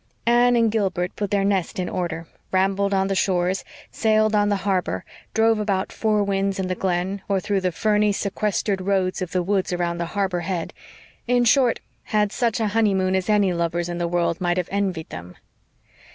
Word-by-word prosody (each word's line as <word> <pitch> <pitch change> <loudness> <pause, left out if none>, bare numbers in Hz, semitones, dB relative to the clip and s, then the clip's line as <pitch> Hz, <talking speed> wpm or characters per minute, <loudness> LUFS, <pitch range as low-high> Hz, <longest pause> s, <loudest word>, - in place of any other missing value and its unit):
Anne 240 +1 +4
and 230 -2 +3
Gilbert 190 -4 -1
put 205 -1 -3
their 200 0 +1
nest 195 -4 0
in 180 -1 -2
order, 170 -2 -3 0.3
rambled 195 +1 +1
on 195 -1 +2
the 195 - 0
shores, 185 -1 +1 0.3
sailed 215 -1 +2
on 205 -1 +3
the 205 - +2
harbor, 190 -3 -1 0.3
drove 225 0 +3
about 195 -3 -1
Four 215 -2 +1
Winds 195 0 0
and 190 -1 -2
the 185 - -1
Glen, 185 +2 -1
or 195 -1 +2
through 200 0 -1
the 185 -1 0
ferny, 210 +3 +2
sequestered 200 -1 -1
roads 190 -1 0
of 180 - -3
the 180 -1 0
woods 195 0 0
around 175 -1 -1
the 170 - -2
harbor 190 -3 0
head; 175 -1 -3 0.5
in 245 0 +3
short, 245 0 +3 0.2
had 210 -1 +1
such 235 -1 0
a 220 -2 +1
honeymoon 195 -4 +2
as 190 +2 -1
any 205 -3 +3
lovers 170 0 -1
in 175 0 -4
the 170 - 0
world 170 0 0
might 175 0 +1
have 180 -1 -2
envied 190 -5 -2
them. 90 +1 -9
195 Hz, 195 wpm, -23 LUFS, 180-210 Hz, 0.5 s, Anne